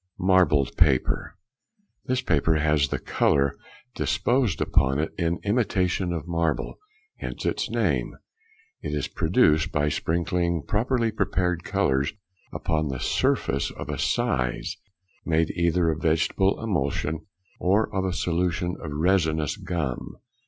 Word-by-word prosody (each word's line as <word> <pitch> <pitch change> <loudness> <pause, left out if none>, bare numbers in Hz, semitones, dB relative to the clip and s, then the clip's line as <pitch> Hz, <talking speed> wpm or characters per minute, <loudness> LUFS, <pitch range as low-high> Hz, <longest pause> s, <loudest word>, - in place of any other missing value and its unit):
Marbled 90 -7 +3
Paper.—This 125 - -2
paper 80 0 +2
has 75 -2 +2
the - - -2
colour 70 -1 +1 0.4
disposed 120 -6 +1
upon 70 0 +2
it 80 +2 -2
in 85 0 0
imitation 95 -5 +1
of 85 -1 -4
marble; 85 -2 -1 0.4
hence - - -6
its - - -1
name. - - 0 0.7
It 75 - -3
is 75 - -1
produced 80 -3 +2
by 75 0 +1
sprinkling 85 +1 0
properly 115 +2 +1
prepared 90 -4 0
colours 65 +2 +1 0.4
upon 80 -2 -1
the 65 -2 -3
surface 70 +3 0
of - - -8
a - - -3
size, 60 -1 0 0.5
made 80 -1 +1
either 85 -1 +2
of 80 - -4
a - - -14
vegetable 80 +5 +1
emulsion, 80 - -1
|34| - - -17 0.4
or 100 +5 +1
of 95 - +1
a 95 - 0
solution 90 0 -1
of 80 - -5
resinous 80 -1 +1
gum. 80 -9 -4
85 Hz, 130 wpm, -25 LUFS, 75-95 Hz, 0.7 s, Marbled